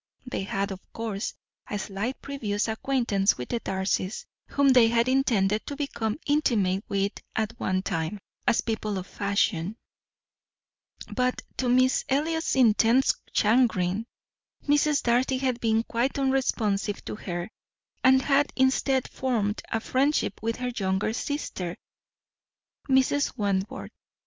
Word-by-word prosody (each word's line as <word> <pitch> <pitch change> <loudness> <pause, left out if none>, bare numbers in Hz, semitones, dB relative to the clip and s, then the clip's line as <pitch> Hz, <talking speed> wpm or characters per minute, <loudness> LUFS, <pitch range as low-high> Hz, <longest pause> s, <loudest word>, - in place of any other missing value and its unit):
They 250 - -3
had, 195 +1 -2
of 190 - -6
course, 220 -3 -3 0.3
a 205 - -2
slight 205 +6 -4
previous 220 -7 -2
acquaintance 220 -4 +1
with 125 - -6
the 235 - -1
Darcys, 190 0 -2 0.2
whom 280 -1 +3
they 250 -3 +7
had 230 +1 +2
intended 220 -6 +2
to 285 - -4
become 255 -6 -2
intimate 215 -10 +2
with 200 0 +1 0.2
at 220 -1 -1
one 185 0 0
time, 165 +4 -2 0.3
as 240 - +4
people 215 -3 -2
of 185 - -4
fashion; 200 -1 -1 1.4
but 250 0 0
to 255 - 0
Miss 255 +1 +3
Elliot's 320 +4 0
intense 235 +1 +4 0.2
chagrin, 215 -3 +2 0.6
Mrs. 295 0 +3
Darcy 250 +2 +2
had 255 -2 -1
been 225 0 +2
quite 240 +5 -1
unresponsive 225 -7 0
to - - -4
her, 175 0 -5 0.5
and 260 0 +6
had 285 0 +3
instead 265 0 +2
formed 225 -5 -1
a 225 - 0
friendship 260 -2 0
with 225 +1 -1
her 250 0 -3
younger 190 +1 0
sister, 225 - -3 1.1
Mrs. 265 +1 +2
Wentworth. 200 -2 -2
230 Hz, 130 wpm, -27 LUFS, 200-265 Hz, 1.4 s, they